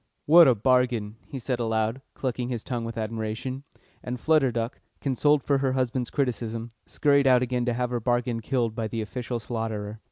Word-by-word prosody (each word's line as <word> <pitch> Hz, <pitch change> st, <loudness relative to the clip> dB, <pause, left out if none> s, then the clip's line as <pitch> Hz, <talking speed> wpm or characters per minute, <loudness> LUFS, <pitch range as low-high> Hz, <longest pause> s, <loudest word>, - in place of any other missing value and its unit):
"What 165 Hz, +1 st, +8 dB
a 125 Hz, -, +5 dB
bargain!" 120 Hz, -2 st, +1 dB
he 140 Hz, -, -6 dB
said 125 Hz, 0 st, -2 dB
aloud, 110 Hz, +2 st, 0 dB
clucking 125 Hz, -2 st, -2 dB
his 120 Hz, -3 st, -3 dB
tongue 120 Hz, -3 st, -3 dB
with 115 Hz, 0 st, -6 dB
admiration. 110 Hz, +4 st, -4 dB, 0.4 s
And 125 Hz, 0 st, -4 dB
Flutter 155 Hz, -4 st, +3 dB
Duck, 115 Hz, +2 st, -3 dB, 0.2 s
consoled 145 Hz, +1 st, +2 dB
for 140 Hz, -1 st, +2 dB
her 135 Hz, -1 st, +1 dB
husband's 130 Hz, -1 st, -1 dB
criticism, 115 Hz, -4 st, -2 dB, 0.2 s
scurried 140 Hz, -2 st, +3 dB
out 125 Hz, -1 st, +5 dB
again 125 Hz, -1 st, -1 dB
to 120 Hz, -, +1 dB
have 125 Hz, +1 st, -1 dB
her 120 Hz, -, 0 dB
bargain 120 Hz, 0 st, 0 dB
killed 115 Hz, -1 st, -1 dB
by 110 Hz, 0 st, -2 dB
the 110 Hz, 0 st, -3 dB
official 120 Hz, +2 st, -4 dB
slaughterer. 110 Hz, -2 st, -4 dB
120 Hz, 185 wpm, -26 LUFS, 115-130 Hz, 0.4 s, What